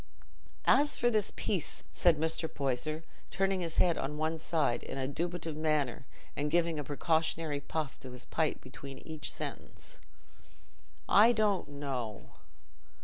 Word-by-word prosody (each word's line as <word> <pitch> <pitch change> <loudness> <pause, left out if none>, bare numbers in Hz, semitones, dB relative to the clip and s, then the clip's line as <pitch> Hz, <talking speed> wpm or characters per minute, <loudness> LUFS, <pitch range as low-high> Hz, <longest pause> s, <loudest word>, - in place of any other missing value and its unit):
"As 295 +1 +5
for 240 0 +3
this 215 -3 +2
peace," 185 -7 -1
said 170 -3 +4
Mr. 160 0 -1
Poyser, 145 +3 -1 0.3
turning 195 0 +1
his 165 -2 -4
head 175 -2 +4
on 150 +2 -3
one 160 +1 -1
side 155 -7 +1
in - - -6
a 130 -1 -1
dubitative 165 +2 -2
manner 150 -5 0 0.3
and 145 +1 0
giving 165 -1 +2
a - - -2
precautionary 160 +1 0
puff 150 0 -3
to 130 - -8
his 125 0 -7
pipe - - 0
between 135 -1 -9
each 155 -2 -4
sentence, - - -7 1.1
"I 225 +4 +7
don't 210 -6 +1
know. 130 -7 -4
155 Hz, 145 wpm, -32 LUFS, 140-175 Hz, 1.1 s, I